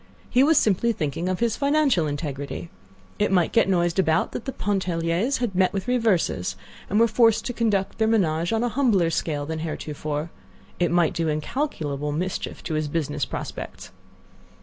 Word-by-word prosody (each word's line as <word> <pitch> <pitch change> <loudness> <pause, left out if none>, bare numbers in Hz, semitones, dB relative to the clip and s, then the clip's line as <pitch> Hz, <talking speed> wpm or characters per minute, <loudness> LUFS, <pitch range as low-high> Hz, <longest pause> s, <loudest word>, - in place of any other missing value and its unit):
He 250 - +4
was 310 +1 +4
simply 220 +3 +3
thinking 165 0 -2
of 185 +2 -2
his 230 -2 +2
financial 280 - +2
integrity. 145 +2 -5 0.5
It 210 - +2
might 180 -4 +3
get 230 - +4
noised 175 -1 +1
about 160 -3 +2
that - - -6
the 265 - -2
Pontelliers 185 +2 0
had 240 -5 -2
met 185 0 +2
with 195 +3 -3
reverses, 200 - +1 0.3
and 205 - +2
were 230 - +6
forced 225 0 +3
to 245 - -2
conduct 210 -5 0
their 220 - +3
ménage 170 -7 +1
on 225 +1 +1
a 245 - +1
humbler 215 -10 +2
scale 150 -3 -1
than 160 +1 -4
heretofore. 155 0 -4 0.5
It 175 - +2
might 175 -2 +2
do 165 -1 -1
incalculable 150 - -2
mischief 180 +5 -3
to 160 - -4
his 155 -1 0
business 150 -2 -1
prospects. - - -7
180 Hz, 170 wpm, -24 LUFS, 155-225 Hz, 0.5 s, were